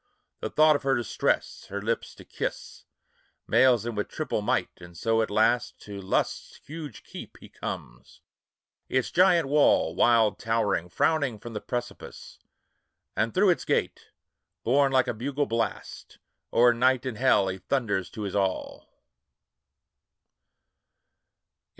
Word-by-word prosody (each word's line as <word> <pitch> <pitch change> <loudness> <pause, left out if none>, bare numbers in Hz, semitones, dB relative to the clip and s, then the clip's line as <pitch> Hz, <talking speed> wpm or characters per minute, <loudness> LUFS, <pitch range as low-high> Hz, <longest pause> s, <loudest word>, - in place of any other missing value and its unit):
The - - -4
thought 155 0 +5
of - - -2
her 135 -1 +1
distress, 120 -3 -1
her - - -4
lips - - -3
to - - -14
kiss, - - -6 0.6
Mails 125 -4 +4
him 120 - -3
with 105 -1 -2
triple 155 -8 -3
might; 125 +5 0
and 85 -1 -13
so 115 +3 +1
at 110 - -1
last 110 +4 +1
To 100 -1 -8
Lust's 95 - -2
huge 150 -7 -8
keep - - -10
he - - -15
comes; 60 +1 -8 0.7
its 130 -1 0
giant 175 -4 +4
wall, 145 +1 +3
Wild 115 -4 +3
towering, 105 -6 0
frowning 140 - +1
from 115 +2 -10
the 105 - -5
precipice; 120 -3 -7 0.8
And 115 +1 0
through 190 - +4
its 175 - -1
gate, - - -1 0.6
borne 135 +3 +3
like 130 -1 +3
a - - -1
bugle 140 +6 -2
blast, 115 -3 -4 0.3
O'er 120 +1 +5
night 130 +2 +2
and 120 -4 -4
hell 125 -7 +4
he 95 0 -4
thunders 100 -6 -1
to 110 - -7
his 100 - -4
all. 95 -2 -2
120 Hz, 140 wpm, -27 LUFS, 105-135 Hz, 0.8 s, thought